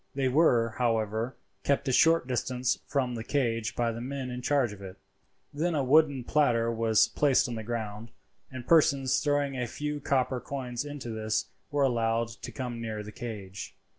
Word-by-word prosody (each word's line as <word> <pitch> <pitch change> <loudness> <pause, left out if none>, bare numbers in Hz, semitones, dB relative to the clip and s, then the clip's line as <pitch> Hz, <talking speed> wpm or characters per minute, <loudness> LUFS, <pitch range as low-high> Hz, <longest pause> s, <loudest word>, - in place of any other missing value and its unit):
They 135 -1 +1
were, 125 -5 +4
however, 115 0 0 0.3
kept 140 0 +1
a - - +2
short 165 +2 +4
distance 125 0 -1
from 130 -3 0
the 115 -2 -4
cage 115 -5 -1
by 120 -1 +1
the 115 +1 -6
men 130 0 -4
in 125 0 -5
charge 130 -4 +1
of 100 - -12
it. 95 0 -9 0.6
Then 165 +3 0
a 140 - +1
wooden 140 -1 +4
platter 115 -4 +2
was 110 -1 +3
placed 140 -4 +3
on 120 - -4
the 110 - -4
ground, 110 -1 -5 0.4
and 130 -2 -8
persons 140 -5 +4
throwing 145 -2 0
a 125 -1 -2
few 150 +4 -4
copper 130 -2 0
coins 125 0 -4
into 145 -5 -6
this 110 0 -2 0.2
were 145 -1 +1
allowed 115 -2 +1
to 115 - -9
come 125 -3 -5
near 110 -2 -4
the 105 - -9
cage. 105 -5 -7
125 Hz, 180 wpm, -29 LUFS, 115-140 Hz, 0.6 s, were